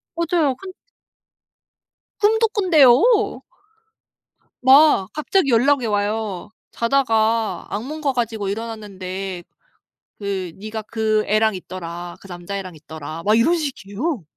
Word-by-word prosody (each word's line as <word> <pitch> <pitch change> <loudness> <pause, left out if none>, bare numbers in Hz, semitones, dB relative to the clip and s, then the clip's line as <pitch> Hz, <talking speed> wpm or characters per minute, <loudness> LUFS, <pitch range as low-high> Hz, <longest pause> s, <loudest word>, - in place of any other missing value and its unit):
맞아요. 330 -5 +1
근 375 +6 -10 1.5
꿈도 445 +2 +3
꾼대요. 400 - +4 1.2
막 265 -6 +6
갑자기 305 +1 +1
연락이 255 +2 +3
와요. 205 -2 -2 0.2
"자다가 230 -3 +1
악몽 270 +10 -5
꿔 280 -3 0
가지고 225 -4 -2
일어났는데 195 -4 -5 0.7
그 195 -3 -4
네가 215 +2 -6
그 215 0 0
애랑 215 +1 +2
있더라. 175 -1 -7
그 - - -13
남자애랑 185 0 -6
있더라." 155 +1 -8
막 215 +3 +3
이런 285 +10 +3
식이에요. 270 - -4
220 Hz, 235 characters per minute, -21 LUFS, 195-280 Hz, 1.5 s, 막